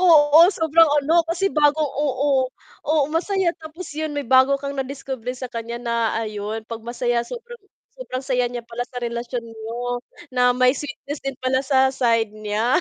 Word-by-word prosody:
Oo, 310 -4 +6
sobrang 325 -3 +4
ano 330 +4 +4
kasi 345 +4 0
bago 295 0 +3
oo, 275 -2 +1 0.4
oo 310 +1 +3
masaya 360 +3 +1
tapos 320 +3 -9
'yun 310 0 -2
may 290 -2 -3
bago 260 +2 +5
kang 280 0 -5
nadiskubre 265 -2 -4
sa 255 - -5
kanya 230 0 -4
na 240 -1 -3 0.3
ayon, 215 0 -4
'pag 230 -1 -7
masaya 240 0 -1
sobrang 475 - -9 0.4
sobrang 270 - -5
saya 250 -2 +1
niya 240 -1 -6
pala 235 +1 -4
sa 250 - -6
relasyon 235 0 -4
niyo, 230 +2 -5 0.3
na 250 0 +4
may 255 0 +5
sweetness 285 +1 -6
din 275 -1 -4
pala 260 0 +1
sa 265 -1 +3
side 230 -4 +1
niya. 215 +3 0
260 Hz, 170 wpm, -22 LUFS, 235-295 Hz, 0.4 s, Oo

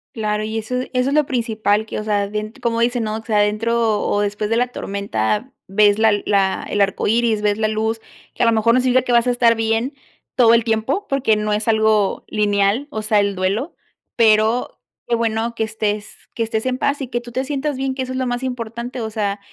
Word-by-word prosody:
Claro, 215 -1 -1
y 220 +1 -3
eso 225 +3 -4
eso 255 +1 -1
es - - -1
lo 300 -2 +3
principal 220 -4 0
que, - - -5
o - - -4
sea, 205 -1 0
bien 210 +1 -4
como 230 -1 0
dicen, 240 0 +1
¿no? 215 0 -2
O 225 - -9
sea, 220 -2 0
dentro 220 +1 +1
o 205 - 0
después 205 +1 -2
de 230 - +1
la 245 +1 +2
tormenta, 200 - -2 0.2
ves 205 +1 +3
la 220 0 +5
la 195 -2 +1
el 205 - 0
arcoíris, 215 +2 +1
ves 210 0 +1
la 215 - +2
luz, 220 +1 -1 0.3
que - - -6
a 235 - +4
lo - - +5
mejor 225 +1 +3
no 255 - +4
significa 255 0 +3
que 250 - -1
vas 235 0 +3
a - - +3
estar 235 -1 +3
bien 225 +4 0 0.4
todo 235 -2 +5
el 230 - +2
tiempo 230 - -1
porque 270 -5 +2
no 210 0 -1
es 210 +2 -2
algo 220 -2 +2
lineal, 205 +5 +1
o 215 -6 -5
sea, 215 0 +3
el 200 -1 0
duelo, 195 - -2 0.4
pero 220 +1 +2 0.3
qué 240 - +2
bueno 230 0 -1
que 230 - -2
estés 215 -1 -2 0.2
que - - -5
estés 225 0 -1
en 255 0 -1
paz 280 +1 0
y 265 - -3
que 240 -1 -2
tú 240 0 -11
te 255 +2 -1
sientas 280 0 -2
bien, 265 0 -1
que 260 - -4
eso 255 0 -4
es - - -3
lo 260 - -1
más 245 0 -2
importante. 245 0 -5
O 220 -1 -4
sea, 205 -2 -2
225 Hz, 235 wpm, -20 LUFS, 210-245 Hz, 0.4 s, la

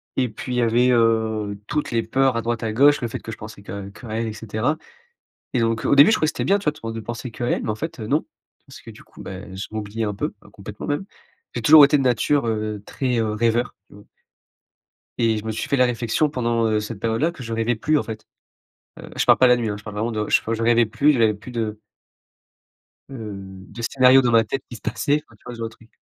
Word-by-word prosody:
et 125 -2 +1
puis 125 +4 -6
il - - -1
y - - +3
avait, 120 +2 +3
heu, 110 -3 +1
toutes 150 +1 -2
les 115 -1 0
peurs 130 +2 +1
à - - 0
droite 115 0 -2
à 110 - -1
gauche. 145 +5 +5
Le 120 - -1
fait 115 - -6
que 115 - -8
je - - -8
pensais 110 -1 -10
que 100 0 -7
qu'à 110 +3 -12
elle 115 +1 -2
et 110 - -4
cetera 115 +7 -2 0.8
et 125 - +2
donc 115 0 0
au - - +3
début 140 +7 +8
je 220 - +4
croyais 155 - +1
que - - -1
c'était - - -1
bien, 200 +1 +4
tu 200 - -10
vois, 150 - +2
tout 115 -6 -7
de 115 - -5
penser 120 +3 -6
qu'à 120 +2 -4
elle - - 0
mais - - -2
en - - -1
fait, 160 +5 -6
heu, 110 - -5
non 150 +6 +1 0.4
parce - - -13
que - - -11
du - - -14
coup, - - -14
bah, 95 +1 -8
je 95 +2 -5
m'oubliais 110 +1 -4
un 105 -1 -2
peu, - - -3
heu, - - -16
complètement - - -9
même. 145 +7 -2 0.5
J'ai - - -3
toujours 155 -1 +9
été 145 - +3
de 140 - +1
nature, 130 +2 +2
heu, 110 -2 -2
très, 130 -3 -2
heu, 110 -1 0
rêveur 115 +2 0
tu - - -18
vois? 100 - -15 1.1
Et 115 -2 +2
je 105 - -6
me 110 - -2
suis 110 - -4
fait 140 - +2
la 125 - +5
réflexion 120 +4 0
pendant, 120 -4 0
heu, 110 -1 +1
cette 105 0 -6
période-là 115 +10 0
que 150 - -12
je 115 - -7
rêvais 115 +2 0
plus 150 +7 +1
en - - -2
fait. 110 -1 -8 0.7
Heu, - - -10
je - - +1
parle - - +6
pas 130 - +6
la 125 0 +5
nuit, 115 -2 -2
hein, 105 - -2
je 105 - -13
parle 105 -1 -8
vraiment 115 +3 -1
de 105 -1 -3
je - - +4
fau 115 - -3
je 115 0 -2
rêvais 120 0 +4
plus, 120 +7 +3
j'avais 115 -4 +3
plus 105 +5 -11
de 110 -3 -3 1.3
heu, 95 -6 -8
de 115 - -8
scénarios 130 +2 +5
dans 120 - +2
ma 115 -1 +5
tête 130 +4 -4
qui 120 - -8
se - - -21
passaient, 145 +8 0
enfin, 115 - -20
tu - - -30
vois 125 - -7
ce 115 - -11
genre 115 - -3
de - - -18
truc. 115 - -21
115 Hz, 275 wpm, -22 LUFS, 110-125 Hz, 1.3 s, toujours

